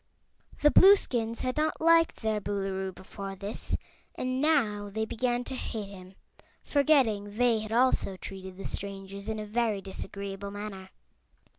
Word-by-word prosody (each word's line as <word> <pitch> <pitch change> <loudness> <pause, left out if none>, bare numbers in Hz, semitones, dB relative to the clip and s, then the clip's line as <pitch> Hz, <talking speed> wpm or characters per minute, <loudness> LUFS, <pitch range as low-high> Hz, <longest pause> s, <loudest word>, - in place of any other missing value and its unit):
The 295 - +7
Blueskins 240 - +5
had 255 +2 -2
not 310 +1 0
liked 330 -4 +4
their 215 -1 0
Boolooroo, 195 -1 -2
before 195 +1 -8
this, 200 +2 -3 0.4
and 255 +1 -2
now 220 -10 +2
they 220 +2 -2
began 240 +2 -1
to 265 - -6
hate 220 -5 -4
him, 185 -1 -12 0.5
forgetting 230 -9 +2
they 240 -2 +3
had 215 0 -6
also 235 -5 +2
treated 190 -1 -8
the 195 - -8
strangers 200 +1 -4
in 220 - -2
a 215 - -4
very 220 -1 0
disagreeable 200 +1 -6
manner. 200 -2 -7
210 Hz, 145 wpm, -29 LUFS, 195-245 Hz, 0.5 s, The